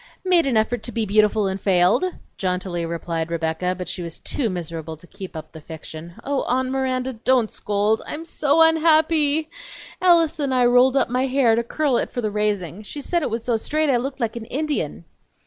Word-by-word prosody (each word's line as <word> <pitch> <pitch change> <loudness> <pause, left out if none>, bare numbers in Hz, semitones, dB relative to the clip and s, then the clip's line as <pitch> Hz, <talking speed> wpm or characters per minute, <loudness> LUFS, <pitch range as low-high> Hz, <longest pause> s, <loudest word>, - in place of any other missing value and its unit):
"Made 350 -5 +4
an 245 -4 +2
effort 220 +2 0
to 240 - -6
be 230 -2 -1
beautiful 210 +1 +3
and 190 0 -2
failed!" 185 - +3 0.3
jauntily 180 -2 -2
replied 165 -1 -3
Rebecca, 170 +2 -1
but 180 - -5
she 180 - -5
was 170 -2 -5
too 250 -6 -2
miserable 165 -3 -5
to 165 - -16
keep 185 0 -10
up 160 - -8
the 160 - -11
fiction. 160 +2 -9
"Oh, 280 -1 -1
Aunt 255 +1 0
Miranda, 260 -1 -1
don't 240 0 +1
scold. 210 +2 0
I'm 315 +2 -6
so 310 0 +3
unhappy! 315 -1 +3 0.5
Alice 340 -4 +4
and 275 -3 0
I 250 -1 +4
rolled 250 +2 +5
up 270 - +2
my 255 +2 0
hair 255 -3 +3
to 235 - +1
curl 265 +2 0
it - - -1
for 245 - -4
the 215 -2 -2
raising. 205 -3 -2
She 215 +7 -7
said 345 +4 -1
it - - -1
was 225 +1 -3
so 235 -2 +1
straight 305 +5 0
I 250 - +3
looked 270 +3 -4
like 230 -2 -2
an 235 -1 -6
Indian!" 260 - -3
230 Hz, 205 wpm, -22 LUFS, 180-275 Hz, 0.5 s, rolled